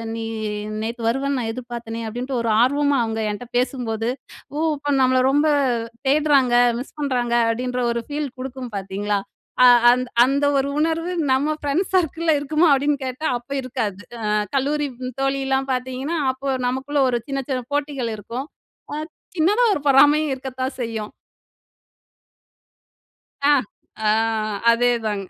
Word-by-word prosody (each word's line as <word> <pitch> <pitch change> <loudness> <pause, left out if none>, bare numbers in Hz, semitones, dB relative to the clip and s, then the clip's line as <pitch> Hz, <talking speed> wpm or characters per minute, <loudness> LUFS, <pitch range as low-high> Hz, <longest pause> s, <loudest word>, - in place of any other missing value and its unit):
நீ 225 - -4 0.6
நேத்து 230 +2 -4
வருவேன்னு 270 +3 0
நான் 225 -2 -2
எதிர்பார்த்தேனே!" 235 -2 -6
அப்படின்ட்டு 250 +3 -3
ஒரு 230 - -1
ஆர்வமா, 285 +3 +2
அவுங்க 225 0 -2
என்ட்ட 210 +4 -6
பேசும்போது 235 -3 -1 0.5
ஓ! - - -1 0.2
அப்ப 290 0 -2
நம்மள 255 0 +4
ரொம்ப 290 +3 +3 0.6
தேடுறாங்க, 275 -4 +3 0.2
மிஸ் 260 - -9
பண்றாங்க, 250 -4 0 0.2
அப்டின்ற 250 +2 -2
ஒரு 235 0 -2
ஃபீல் 290 -1 -3
குடுக்கும் 255 -1 -6
பாத்தீங்களா? 200 +1 -2 0.5
ஆ. - - +9 0.2
அந்த 250 +1 0 0.2
அந்த 280 +2 +1
ஒரு 275 +1 0
உணர்வு 330 +2 0 0.2
நம்ம 290 +4 +1
ஃப்ரெண்ட்ஸ் 295 +6 -1
சர்க்கிள்ல 330 -2 +2
இருக்குமா 305 +4 +2
அப்படின்னு 285 +1 +1
கேட்டா, 260 +4 -4
அப்ப 245 +3 -21
இருக்காது. 230 -6 -3 0.2
அ - - -2 0.3
கல்லூரி 290 +2 +1 0.3
தோழிலாம் 270 0 0
பாத்தீங்கன்னா, 260 +5 -3 0.2
அப்போ 265 +2 -7 0.2
நமக்குள்ள 270 +3 -1
ஒரு 240 -1 0
சின்ன 275 -1 -2
சின்ன 255 -2 -1
போட்டிகள் 280 -5 -1
இருக்கும். 235 +7 -6 0.5
ஆ, - - -2 0.4
சின்னதா 410 +10 +3
ஒரு 320 - -2
பொறாமையும் 290 +2 +5
இருக்கத்தான் 260 0 -5
செய்யும். 220 -2 -4 2.4
ஆ - - +6 0.6
ஆ - - +4 0.6
அதேதாங்க! 230 -4 +1
265 Hz, 135 wpm, -22 LUFS, 240-285 Hz, 2.4 s, ஆ